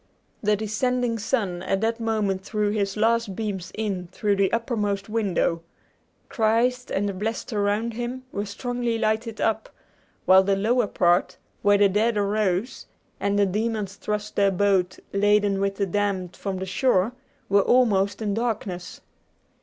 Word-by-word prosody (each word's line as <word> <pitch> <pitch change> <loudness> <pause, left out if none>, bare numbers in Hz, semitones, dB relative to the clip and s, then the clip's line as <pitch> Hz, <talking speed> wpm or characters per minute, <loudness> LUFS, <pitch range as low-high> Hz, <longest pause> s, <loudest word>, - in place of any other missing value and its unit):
The 210 0 +2
descending 230 +2 -1
sun 200 -6 -1
at 195 +1 0
that 225 +1 0
moment 210 -4 -1
threw 210 0 -1
his 200 -1 -1
last 225 -2 +1
beams 200 -5 -4
in 195 -5 -3
through 205 -1 0
the 195 -1 +2
uppermost 210 -4 -1
window. 195 -6 0 0.7
Christ, 245 +3 +1
and 205 +1 0
the 200 - -2
blessed 220 +5 -4
around 210 +3 0
him, 240 +3 -4
were 205 +1 -3
strongly 240 +2 -2
lighted 220 0 -1
up; 220 0 0 0.6
while 190 0 +7
the 195 +1 +1
lower 225 +3 +2
part, 175 -1 +2 0.2
where 205 0 +4
the 205 0 +5
dead 210 +3 +1
arose, 205 +1 -1 0.3
and 200 0 0
the 205 - +4
demons 210 0 -2
thrust 210 +1 -4
their 200 -1 +4
boat 190 -1 +1 0.2
laden 205 0 +3
with 195 0 0
the 200 - 0
damned 190 -2 -1
from 195 -2 -4
the 190 - -4
shore, 190 +1 +2 0.4
were 200 +1 +4
almost 205 -4 +2
in 205 -2 0
darkness. 205 -6 -3
205 Hz, 155 wpm, -24 LUFS, 195-225 Hz, 0.7 s, while